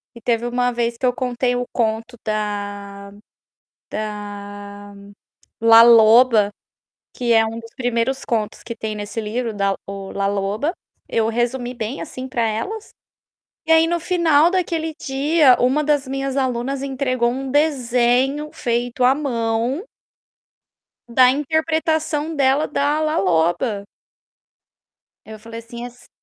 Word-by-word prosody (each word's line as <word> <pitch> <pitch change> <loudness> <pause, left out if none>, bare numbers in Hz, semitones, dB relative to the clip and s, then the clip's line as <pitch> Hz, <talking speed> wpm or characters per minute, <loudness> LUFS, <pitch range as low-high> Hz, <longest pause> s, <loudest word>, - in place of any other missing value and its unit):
E 235 - -12
teve 235 0 0
uma 245 0 0
vez 235 0 -2
que 255 - -2
eu 250 - +3
contei 245 -1 -1
o 245 0 -2
conto 230 +1 -1
da 205 -2 -4 0.8
da 205 -1 -7 0.7
La 230 0 +8
Loba, 230 -1 +6 0.7
que 240 -2 +1
é 225 0 +5
um 225 +1 -5
dos 230 0 -13
primeiros 245 +1 -1
contos 220 -2 -2
que 235 - -6
tem 220 -2 -4
nesse 210 +2 -5
livro 230 +2 -3
da 200 -1 0
o 195 -1 -7
La 200 0 -1
Loba. 205 - -1 0.4
Eu 225 -1 +1
resumi 240 +2 -1
bem, 235 +3 -5
assim, 260 -4 -7
para 240 -2 -1
elas, 400 - -4 0.8
e - - +1
aí 320 0 +6
no 345 0 0
final 330 -2 +3
daquele 330 -4 -1
dia, 280 0 +3
uma 265 +5 +2
das 290 -2 +1
minhas 270 0 -3
alunas 260 +1 -1
entregou 255 -3 0
um 265 +1 -4
desenho 270 0 +1
feito 240 +1 -2
à 255 +2 +6
mão 240 - -1 1.3
da 250 +2 +5
interpretação 315 +1 0
dela 275 +1 +2
da 290 +1 0
La 310 0 0
Loba. 185 +4 +1 1.4
Aí 220 - -10
eu 215 - -9
falei 230 +1 -9
assim 235 +1 -8
as 245 0 -15
245 Hz, 135 wpm, -20 LUFS, 220-275 Hz, 1.4 s, La